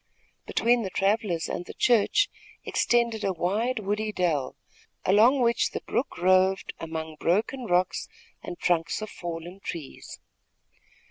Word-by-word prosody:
Between 240 Hz, +1 st, +2 dB
the 195 Hz, -, -3 dB
travellers 195 Hz, -2 st, 0 dB
and 175 Hz, -, -4 dB
the -, -, -10 dB
church 245 Hz, -, +3 dB, 0.4 s
extended 235 Hz, -2 st, +1 dB
a 195 Hz, -, +1 dB
wide, 210 Hz, +9 st, 0 dB
woody 215 Hz, +1 st, -1 dB
dell, 160 Hz, -9 st, -1 dB, 0.5 s
along 230 Hz, +8 st, +5 dB
which 235 Hz, -1 st, +2 dB
the -, -, -3 dB
brook 260 Hz, -, -2 dB
roved 185 Hz, +1 st, +3 dB
among 160 Hz, -1 st, -5 dB
broken 220 Hz, +9 st, 0 dB
rocks 180 Hz, -2 st, +1 dB, 0.3 s
and 175 Hz, -, -7 dB
trunks 170 Hz, +3 st, 0 dB
of 215 Hz, -, -7 dB
fallen 175 Hz, +2 st, -7 dB
trees. 165 Hz, -7 st, -8 dB
195 Hz, 130 wpm, -27 LUFS, 175-225 Hz, 0.5 s, along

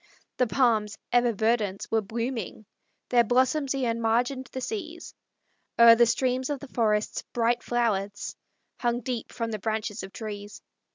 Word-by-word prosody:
The 250 Hz, -, +2 dB
palms, 220 Hz, -4 st, +2 dB
ever 245 Hz, 0 st, +4 dB
verdant, 215 Hz, -2 st, 0 dB
were 225 Hz, 0 st, +3 dB
blooming, 225 Hz, 0 st, -4 dB, 0.4 s
Their 240 Hz, -1 st, +5 dB
blossoms 260 Hz, +4 st, +2 dB
e'en 230 Hz, -3 st, -1 dB
margined 245 Hz, +4 st, 0 dB
the 260 Hz, -, -4 dB
seas; 340 Hz, -, -6 dB, 0.6 s
O'er 235 Hz, 0 st, +9 dB
the 235 Hz, +1 st, +5 dB
streams 255 Hz, +3 st, 0 dB
of 290 Hz, -2 st, -2 dB
the 285 Hz, -, -10 dB
forests 215 Hz, -3 st, 0 dB
bright 235 Hz, 0 st, +1 dB
flowers 205 Hz, -4 st, -1 dB, 0.4 s
Hung 240 Hz, 0 st, 0 dB
deep 240 Hz, -1 st, -4 dB
from 230 Hz, -1 st, -3 dB
the 215 Hz, -, -3 dB
branches 215 Hz, 0 st, -2 dB
of 190 Hz, +1 st, -8 dB
trees. 205 Hz, -1 st, -7 dB
235 Hz, 150 wpm, -27 LUFS, 215-250 Hz, 0.6 s, O'er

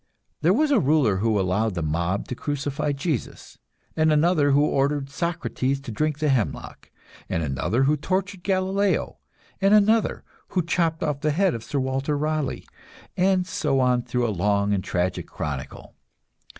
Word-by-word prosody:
There 165 Hz, +4 st, +4 dB
was 295 Hz, +8 st, +2 dB
a 270 Hz, -, +5 dB
ruler 140 Hz, -, +2 dB
who 110 Hz, +1 st, +1 dB
allowed 95 Hz, +3 st, 0 dB
the 85 Hz, -, -2 dB
mob 85 Hz, +5 st, -1 dB
to -, -, -2 dB
crucify 145 Hz, +1 st, -2 dB
Jesus, 140 Hz, -, -4 dB, 0.4 s
and 155 Hz, 0 st, +3 dB
another 155 Hz, -1 st, +3 dB
who 145 Hz, +1 st, +4 dB
ordered 140 Hz, 0 st, 0 dB
Socrates 140 Hz, -4 st, -2 dB
to 120 Hz, -, -7 dB
drink 150 Hz, +6 st, -1 dB
the 155 Hz, -1 st, 0 dB
hemlock, 125 Hz, -6 st, -2 dB, 0.4 s
and 85 Hz, -, -1 dB
another 75 Hz, -, 0 dB
who 145 Hz, +3 st, +3 dB
tortured 185 Hz, +5 st, -2 dB
Galileo, 190 Hz, +1 st, 0 dB, 0.4 s
and 195 Hz, +2 st, +5 dB
another 215 Hz, +1 st, +3 dB, 0.2 s
who 180 Hz, -3 st, -1 dB
chopped 165 Hz, -1 st, 0 dB
off 150 Hz, -3 st, -2 dB
the 155 Hz, -, +1 dB
head 180 Hz, +4 st, +2 dB
of 115 Hz, -, -5 dB
Sir 145 Hz, -, -4 dB
Walter 135 Hz, +3 st, -1 dB
Raleigh 155 Hz, -1 st, -2 dB, 0.5 s
and 185 Hz, 0 st, +2 dB
so 135 Hz, -6 st, 0 dB
on 125 Hz, -1 st, +2 dB
through 120 Hz, 0 st, -1 dB
a 110 Hz, -, -1 dB
long 100 Hz, +2 st, +1 dB
and 95 Hz, -2 st, -1 dB
tragic 90 Hz, 0 st, -2 dB
chronicle. 70 Hz, -3 st, -6 dB
145 Hz, 165 wpm, -24 LUFS, 115-170 Hz, 0.5 s, a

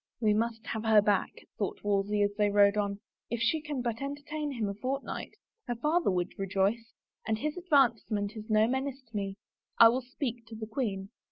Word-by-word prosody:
" -, -, -61 dB
We 215 Hz, -3 st, +3 dB
must 225 Hz, +1 st, -1 dB
have 220 Hz, -1 st, -3 dB
her 220 Hz, -1 st, +6 dB
back," 205 Hz, -1 st, +2 dB, 0.3 s
thought 200 Hz, -, -3 dB
Wolsey 205 Hz, 0 st, +1 dB
as 205 Hz, 0 st, +1 dB
they 210 Hz, -1 st, +2 dB
rode 200 Hz, 0 st, +5 dB
on, 200 Hz, -1 st, -1 dB, 0.2 s
" -, -, -63 dB
if 235 Hz, -, -2 dB
she 305 Hz, +7 st, +2 dB
can 295 Hz, -4 st, -4 dB
but 235 Hz, -1 st, -2 dB
entertain 290 Hz, +2 st, -4 dB
him 225 Hz, -5 st, -1 dB
a 200 Hz, -, -2 dB
fortnight. 260 Hz, +7 st, -4 dB, 0.3 s
Her 240 Hz, -, -1 dB
father 305 Hz, +6 st, +1 dB
would 180 Hz, -1 st, -2 dB
rejoice... 195 Hz, +4 st, 0 dB, 0.3 s
and 220 Hz, -1 st, +1 dB
his 300 Hz, +6 st, -2 dB
advancement 235 Hz, -, +2 dB
is 215 Hz, +1 st, -8 dB
no 215 Hz, 0 st, +5 dB
menace 265 Hz, +1 st, -2 dB
to -, -, -12 dB
me.... 195 Hz, -1 st, -2 dB, 0.4 s
I 230 Hz, -, +10 dB
will 250 Hz, +3 st, 0 dB
speak 245 Hz, -2 st, -5 dB
to 225 Hz, -, -9 dB
the 220 Hz, 0 st, -5 dB
queen." 210 Hz, -4 st, -3 dB
225 Hz, 205 wpm, -30 LUFS, 205-260 Hz, 0.4 s, I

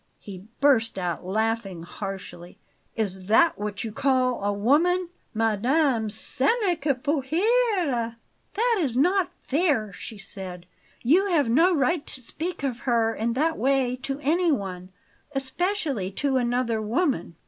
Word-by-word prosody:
He 190 Hz, -2 st, -10 dB, 0.2 s
burst 245 Hz, -7 st, +3 dB
out 180 Hz, -2 st, -2 dB
laughing 215 Hz, -3 st, -1 dB
harshly. 180 Hz, -2 st, -8 dB, 0.4 s
"Is 190 Hz, -4 st, -3 dB
THAT 320 Hz, +9 st, +4 dB
what 205 Hz, 0 st, -4 dB
you 225 Hz, -, -4 dB
call 255 Hz, -1 st, +1 dB
a 205 Hz, -, +1 dB
woman? 320 Hz, -, +2 dB, 0.2 s
'Madame, 225 Hz, +2 st, +1 dB
ce 260 Hz, +5 st, -1 dB, 0.2 s
n'est 355 Hz, -6 st, +1 dB
que 280 Hz, -2 st, +1 dB
pour 285 Hz, +3 st, -1 dB
rire!'" 340 Hz, -, +1 dB, 0.4 s
"That 460 Hz, 0 st, +2 dB
is 255 Hz, -6 st, -1 dB
not 360 Hz, +5 st, +3 dB
fair!" 275 Hz, -, +1 dB
she 215 Hz, +4 st, -8 dB
said. 185 Hz, -3 st, -8 dB, 0.4 s
"You 345 Hz, +11 st, +4 dB
have 305 Hz, -10 st, +2 dB
no 340 Hz, +8 st, +4 dB
right 290 Hz, +3 st, +1 dB
to -, -, -3 dB
speak 320 Hz, +6 st, -5 dB
of 255 Hz, -4 st, -2 dB
her 225 Hz, -1 st, +2 dB
in 230 Hz, +2 st, -1 dB
that 315 Hz, +6 st, 0 dB
way 260 Hz, 0 st, +2 dB
to 270 Hz, +1 st, -4 dB
anyone 250 Hz, -, 0 dB, 0.5 s
especially 270 Hz, -, -1 dB
to 270 Hz, +4 st, 0 dB
another 240 Hz, -2 st, 0 dB
woman!" 220 Hz, -, -1 dB
255 Hz, 140 wpm, -25 LUFS, 215-315 Hz, 0.5 s, THAT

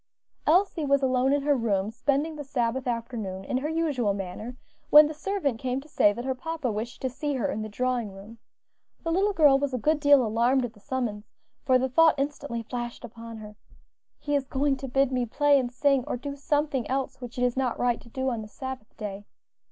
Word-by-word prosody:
Elsie 350 Hz, 0 st, +3 dB
was 280 Hz, -1 st, +2 dB
alone 260 Hz, 0 st, +2 dB
in 285 Hz, 0 st, +1 dB
her 295 Hz, -, +2 dB
own 260 Hz, -, -1 dB
room, 205 Hz, -2 st, 0 dB
spending 285 Hz, +6 st, 0 dB
the 295 Hz, -, -6 dB
Sabbath 255 Hz, -1 st, -1 dB
afternoon 230 Hz, -6 st, -4 dB
in 255 Hz, -, -1 dB
her 290 Hz, +4 st, -2 dB
usual 290 Hz, -11 st, 0 dB
manner, 200 Hz, +6 st, -6 dB, 0.3 s
when 300 Hz, +1 st, +9 dB
the 305 Hz, -, -3 dB
servant 300 Hz, -, -2 dB
came 255 Hz, +1 st, -1 dB
to 285 Hz, -, -13 dB
say 205 Hz, -8 st, +4 dB
that 240 Hz, +4 st, -6 dB
her 265 Hz, -, 0 dB
papa 305 Hz, -1 st, -3 dB
wished 220 Hz, +5 st, -5 dB
to -, -, +2 dB
see 290 Hz, +3 st, -2 dB
her 250 Hz, -, -1 dB
in 215 Hz, -, -3 dB
the 215 Hz, -, -5 dB
drawing 245 Hz, -1 st, -1 dB
room. 205 Hz, +4 st, -12 dB, 0.6 s
The 330 Hz, -, -1 dB
little 390 Hz, +4 st, +2 dB
girl 295 Hz, -7 st, +5 dB
was 275 Hz, -2 st, -1 dB
a -, -, 0 dB
good 300 Hz, +6 st, +1 dB
deal 285 Hz, -3 st, +5 dB
alarmed 240 Hz, +4 st, +2 dB
at 230 Hz, -, -7 dB
the 210 Hz, -, -19 dB
summons, 220 Hz, -3 st, -3 dB, 0.4 s
for 255 Hz, -1 st, +5 dB
the 260 Hz, +1 st, 0 dB
thought 320 Hz, +5 st, +5 dB
instantly 275 Hz, -4 st, -3 dB
flashed 240 Hz, +1 st, -5 dB
upon 230 Hz, 0 st, -9 dB
her, 210 Hz, -1 st, -10 dB, 0.6 s
"He 290 Hz, -, -4 dB
is 280 Hz, -, +1 dB
going 275 Hz, +1 st, +1 dB
to 270 Hz, 0 st, -6 dB
bid 270 Hz, +1 st, +2 dB
me 250 Hz, -2 st, 0 dB
play 290 Hz, +4 st, +4 dB
and 245 Hz, -2 st, -2 dB
sing, 275 Hz, 0 st, +2 dB
or -, -, -2 dB
do 280 Hz, +3 st, -6 dB
something 290 Hz, -3 st, -1 dB
else 265 Hz, 0 st, -2 dB
which 245 Hz, 0 st, -8 dB
it 250 Hz, -, 0 dB
is 245 Hz, -1 st, +1 dB
not 260 Hz, -2 st, 0 dB
right 245 Hz, -1 st, 0 dB
to 235 Hz, -, -16 dB
do 260 Hz, +2 st, -2 dB
on 230 Hz, -2 st, -3 dB
the 215 Hz, -, -8 dB
Sabbath 260 Hz, -1 st, -8 dB
day." 205 Hz, -1 st, -6 dB
255 Hz, 225 wpm, -27 LUFS, 230-285 Hz, 0.6 s, when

